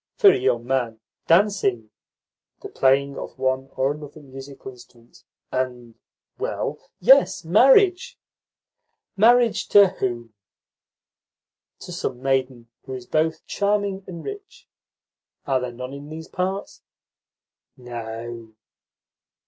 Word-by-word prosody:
"For 400 Hz, -, +7 dB
a -, -, +1 dB
young 120 Hz, -2 st, 0 dB
man, 120 Hz, -4 st, -1 dB, 0.3 s
dancing, 165 Hz, -, +2 dB, 0.7 s
the -, -, -9 dB
playing 140 Hz, +1 st, +2 dB
of -, -, -8 dB
one 130 Hz, 0 st, -1 dB
or 135 Hz, +1 st, +1 dB
another 150 Hz, 0 st, -9 dB
musical 135 Hz, -1 st, -10 dB
instrument, 120 Hz, -1 st, -19 dB, 0.3 s
and 125 Hz, -2 st, -3 dB, 0.5 s
well, -, -, -3 dB, 0.2 s
yes, -, -, +4 dB
marriage." 275 Hz, -, +4 dB, 1.0 s
"Marriage 235 Hz, +2 st, +4 dB
to 200 Hz, -2 st, +7 dB
whom?" 120 Hz, -, -4 dB, 1.5 s
"To -, -, -9 dB
some 125 Hz, -2 st, -4 dB
maiden 130 Hz, -2 st, -1 dB, 0.2 s
who 130 Hz, -1 st, -6 dB
is 125 Hz, -1 st, -8 dB
both 160 Hz, +1 st, -1 dB
charming 200 Hz, -1 st, -1 dB
and 170 Hz, -3 st, -8 dB
rich. 395 Hz, -2 st, -9 dB, 0.8 s
Are 135 Hz, -2 st, +1 dB
there 125 Hz, -1 st, -4 dB
none 125 Hz, +2 st, -8 dB
in 140 Hz, +1 st, -9 dB
these 160 Hz, +1 st, -8 dB
parts?" 190 Hz, +2 st, -4 dB, 1.0 s
"No." 115 Hz, -2 st, -8 dB
135 Hz, 110 wpm, -23 LUFS, 125-190 Hz, 1.5 s, For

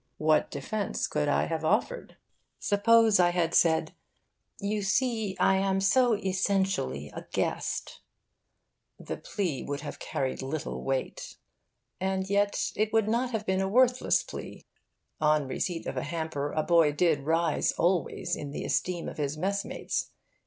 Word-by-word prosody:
What 155 Hz, -1 st, +2 dB
defence 200 Hz, +9 st, -3 dB
could 150 Hz, -1 st, -1 dB
I 145 Hz, -, +2 dB
have 160 Hz, -1 st, -3 dB
offered? 225 Hz, -, -1 dB, 0.4 s
Suppose 220 Hz, 0 st, +4 dB
I 175 Hz, -1 st, +5 dB
had 175 Hz, -1 st, 0 dB
said 160 Hz, -1 st, +3 dB, 0.7 s
'You 205 Hz, +1 st, -1 dB
see, 220 Hz, -1 st, 0 dB
I 190 Hz, -, +4 dB
am 195 Hz, 0 st, +1 dB
so 235 Hz, +4 st, +4 dB
essentially 190 Hz, -, -1 dB
a -, -, -9 dB
guest,' -, -, -2 dB, 1.0 s
the -, -, -5 dB
plea 175 Hz, -10 st, -3 dB
would 145 Hz, 0 st, -4 dB
have 150 Hz, -, -7 dB
carried 135 Hz, 0 st, -3 dB
little 140 Hz, +3 st, -4 dB
weight. 135 Hz, -1 st, -3 dB, 0.6 s
And 190 Hz, 0 st, -1 dB
yet 205 Hz, 0 st, +1 dB
it 215 Hz, 0 st, 0 dB
would 225 Hz, -2 st, +2 dB
not 240 Hz, +3 st, +1 dB
have 220 Hz, -3 st, -3 dB
been 190 Hz, 0 st, +1 dB
a 190 Hz, -, 0 dB
worthless 250 Hz, +3 st, +3 dB
plea. -, -, -9 dB, 0.5 s
On 150 Hz, -2 st, +2 dB
receipt 165 Hz, +6 st, -3 dB
of -, -, -4 dB
a -, -, 0 dB
hamper, 155 Hz, -2 st, -3 dB
a 155 Hz, -, 0 dB
boy 165 Hz, -3 st, +4 dB
did 160 Hz, -1 st, +2 dB
rise, 165 Hz, +2 st, +1 dB
always, 175 Hz, 0 st, 0 dB
in 145 Hz, -, -6 dB
the 140 Hz, -, -5 dB
esteem 175 Hz, -2 st, -1 dB
of -, -, -7 dB
his 145 Hz, 0 st, -2 dB
mess 200 Hz, +4 st, -1 dB
mates. -, -, -3 dB
180 Hz, 150 wpm, -28 LUFS, 155-205 Hz, 1.0 s, I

